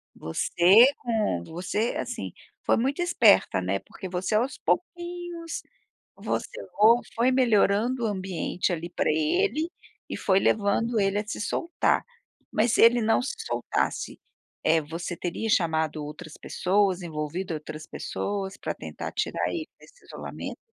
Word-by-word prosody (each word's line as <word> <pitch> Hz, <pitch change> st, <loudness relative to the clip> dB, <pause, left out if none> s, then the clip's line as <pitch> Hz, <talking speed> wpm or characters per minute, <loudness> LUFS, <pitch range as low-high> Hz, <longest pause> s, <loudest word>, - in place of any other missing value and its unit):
você 175 Hz, -, +5 dB
com 215 Hz, -, -1 dB
você, 185 Hz, +7 st, -2 dB
assim, -, -, -4 dB, 0.3 s
foi -, -, +3 dB
muito 270 Hz, +8 st, 0 dB
esperta, 240 Hz, -, +4 dB
né? 95 Hz, +2 st, -1 dB
Porque 190 Hz, -, -9 dB
você, 185 Hz, +4 st, -1 dB
aos 245 Hz, +5 st, +1 dB
pouquinhos, 345 Hz, -1 st, -3 dB, 0.6 s
você -, -, -3 dB, 0.2 s
fo 225 Hz, +4 st, +6 dB
foi 240 Hz, +3 st, +3 dB
melhorando 235 Hz, -1 st, +3 dB
o -, -, +3 dB
ambiente 185 Hz, -2 st, -2 dB
ali 170 Hz, +1 st, -3 dB
pra -, -, 0 dB
ele 310 Hz, -, +1 dB, 0.4 s
e -, -, -4 dB
foi 190 Hz, 0 st, +3 dB
levando 220 Hz, +3 st, +1 dB
ele 195 Hz, 0 st, +2 dB
a 210 Hz, -, -3 dB
se 215 Hz, -, -5 dB
soltar. 335 Hz, +9 st, 0 dB, 0.5 s
Mas 220 Hz, +2 st, +2 dB
se -, -, +3 dB
ele 235 Hz, +1 st, +7 dB
não 220 Hz, +2 st, +3 dB
se 280 Hz, -, -3 dB
soltasse, 450 Hz, -, -2 dB, 0.5 s
eh, 160 Hz, 0 st, +4 dB
você 165 Hz, +3 st, -5 dB
teria 180 Hz, +5 st, -3 dB
chamado 160 Hz, -5 st, +1 dB
outras 155 Hz, +1 st, -9 dB
pessoas 190 Hz, -1 st, +1 dB
envolvido 165 Hz, +3 st, -4 dB
outras 155 Hz, 0 st, -7 dB
pessoas 200 Hz, -1 st, -4 dB
para -, -, -4 dB
tentar -, -, -7 dB
tirar -, -, -1 dB
ele 325 Hz, -2 st, -4 dB
desse -, -, -20 dB
isolamento? -, -, -7 dB
205 Hz, 140 wpm, -26 LUFS, 175-245 Hz, 0.6 s, ele